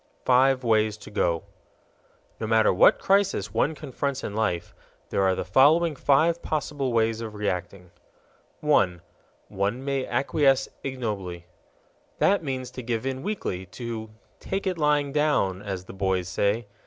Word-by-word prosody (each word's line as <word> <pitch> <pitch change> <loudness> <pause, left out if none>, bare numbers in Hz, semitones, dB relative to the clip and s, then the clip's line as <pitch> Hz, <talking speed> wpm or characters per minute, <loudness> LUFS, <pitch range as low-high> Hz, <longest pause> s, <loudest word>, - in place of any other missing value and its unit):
Five 130 +1 +4
Ways 110 -2 +2
To 105 - -12
Go 85 -4 0 1.0
No 110 - -3
matter 110 -2 +4
what 90 - +6
crisis 195 0 +1
one 155 +3 +1
confronts 140 -1 -4
in 100 - -4
life, 105 -6 -1 0.4
there - - +1
are 95 -1 +3
the - - -3
following 155 +4 +4
five 160 +5 +2
possible 145 -3 -2
ways 115 -1 +1
of 110 -2 -6
reacting: 90 -3 -4 0.7
1. 95 - +2 0.5
One 105 +7 -2
may 135 -2 -1
acquiesce 135 -1 +2 0.2
ignobly. 105 -10 -4 0.7
That 195 -3 +3
means 130 -3 -4
to 130 - -7
give 115 -1 -3
in 135 0 -3
weakly, 95 - -4
to 115 +2 -6 0.3
"take 195 +1 -3
it 185 -3 -1
lying 150 -2 +2
down," 145 -11 +1
as 95 -3 -5
the - - -10
boys 95 -2 -1
say. 100 +5 0
120 Hz, 145 wpm, -25 LUFS, 100-140 Hz, 1.0 s, what